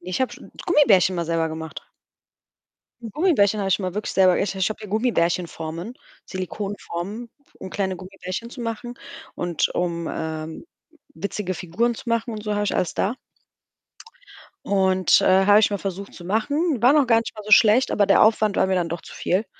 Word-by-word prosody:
ich 185 +7 -4
habe 260 - -1
schon - - -13 0.2
Gummibärchen 195 - +4
mal 170 -1 -2
selber 165 0 0
gemacht. 160 0 -7 1.3
Gummibärchen 220 - +2
habe 195 - -1
ich 190 - +2
immer 185 -2 -4
wirklich 210 +1 -3
selber 185 -2 +4
ich 195 -1 -1
ich 190 0 0
habe 215 - -5
hier 210 - -8
Gummibärchen-Formen, 175 -3 -1 0.3
Silikonformen, 200 +3 -5 0.3
um 190 - -8
kleine 190 -2 -2
Gummibärchen 190 +4 -7
zu 250 - -9
machen 235 +1 -5 0.4
und 175 -3 -1
um, 170 -2 -2
äh, 160 0 -5 0.5
witzige 185 +2 -4
Figuren 210 +8 -1
zu 235 - -9
machen 230 0 0
und 215 -1 -6
so, 210 - -2
habe 205 0 0
ich - - -1
alles 180 - -1
da. 210 +6 0 1.5
Und, 190 -2 +3
äh, 190 +1 +4
habe 205 0 +7
ich 215 - +3
mal 200 - -2
versucht 195 +1 -6
zu 175 - -12
machen. 275 - 0
Waren 265 +5 +6
auch 280 - +3
gar 230 -1 +5
nicht 230 - -5
mal 215 - -9
so 215 - -7
schlecht, 220 +4 +6
aber 205 -1 +2
der 195 - +5
Aufwand 215 -1 +3
war - - +3
mir 190 - 0
dann 175 -2 0
doch 170 - -4
zu - - -13
viel, 195 +5 -1
195 Hz, 185 wpm, -23 LUFS, 180-220 Hz, 1.5 s, habe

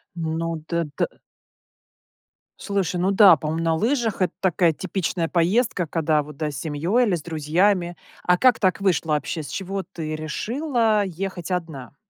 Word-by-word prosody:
Ну, 165 -1 -3
т 170 -1 -1
ты - - +1 1.5
Слушай, 190 -3 -1
ну 185 +2 +2
да, 195 -4 +8
по-моему, 155 +3 -3
на 165 -1 +2
лыжах 230 - 0
это 180 - -1
такая 175 -3 +2
типичная 175 0 -2
поездка, 185 +3 +1
когда 155 -1 +1
вот, 150 -1 -12
да, 155 0 -2
с 145 - -7
семьёй 170 +11 +1
или 205 - 0
с 165 - -5
друзьями. 175 +4 +1 0.3
А 180 - +4
как 255 +5 +4
так 185 -2 +1
вышло 175 -4 +1
вообще? 150 +1 -1
С - - -8
чего 195 +4 -4
ты 155 -3 -6
решила 220 - 0
ехать 185 0 -5
одна? 160 -7 -4
175 Hz, 160 wpm, -23 LUFS, 160-195 Hz, 1.5 s, да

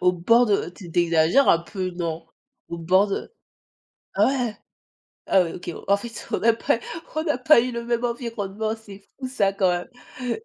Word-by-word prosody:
Au 180 0 +4
bord 230 +8 +4
de 200 -4 +1
tu 180 -2 -12
tu - - +3
exagères 170 +10 +3
un 165 - +6
peu 185 +1 -4
non? 165 -2 -4 0.4
Au 170 - -5
bord 185 +5 +3
de 200 - -4 0.8
ah - - +4 1.1
ouais, 170 - -2
OK, 175 -1 -6 0.2
en 200 0 +4
fait, 230 +2 -8
on - - -1
a 230 0 +5
pas 230 - 0 0.4
on 315 +1 -1
a 295 - +1
pas 255 -1 +6
eu 250 +1 -2
le 235 0 -4
même 235 0 -1
environnement, 220 -3 -3
c'est 205 -3 -13 0.2
fou 260 - -4
ça 200 -6 +1
quand 190 -2 +2
même. 245 +6 -4
200 Hz, 185 wpm, -24 LUFS, 180-235 Hz, 1.1 s, un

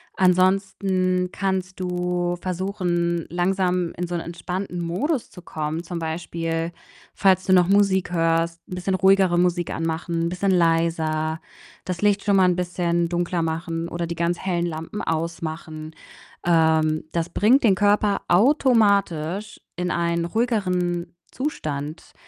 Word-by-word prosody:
ansonsten 185 0 +2
kannst 190 -2 -2
du 180 -1 -1
versuchen, 175 -2 -1
langsam 180 0 0
in 175 +1 -2
so 175 - -3
'nen 170 - -3
entspannten 180 +1 -4
Modus 240 - -1
zu 180 - -12
kommen. 155 0 -4
Zum 175 0 -5
Beispiel, 165 0 -3 0.4
falls 190 -1 +3
du 185 - +3
noch 180 -1 +5
Musik 195 -2 +3
hörst, 165 0 +1
'n 180 - -5
bisschen 185 +1 -1
ruhigere 190 -2 +4
Musik 175 -1 +1
anmachen, 165 +1 -2
'n - - 0
bisschen 180 +2 0
leiser, 165 -2 +1 0.5
das 180 -2 -4
Licht 205 -1 +2
schon 200 -1 +2
mal 185 - +5
'n 175 - +1
bisschen 175 -1 0
dunkler 175 0 -1
machen 165 +1 -3
oder 170 0 -3
die 170 - -4
ganz 170 +1 -1
hellen 175 -2 -1
Lampen 165 +5 -5
ausmachen. 160 -1 -4 0.5
Ähm, 160 -2 +3
das 170 -1 -1
bringt 245 +7 +3
den 200 -4 +5
Körper 205 0 +2
automatisch 200 - +2
in 180 0 -2
einen 170 0 0
ruhigeren 180 -5 -1 0.2
Zustand. 155 - -4
175 Hz, 135 wpm, -23 LUFS, 165-190 Hz, 0.5 s, noch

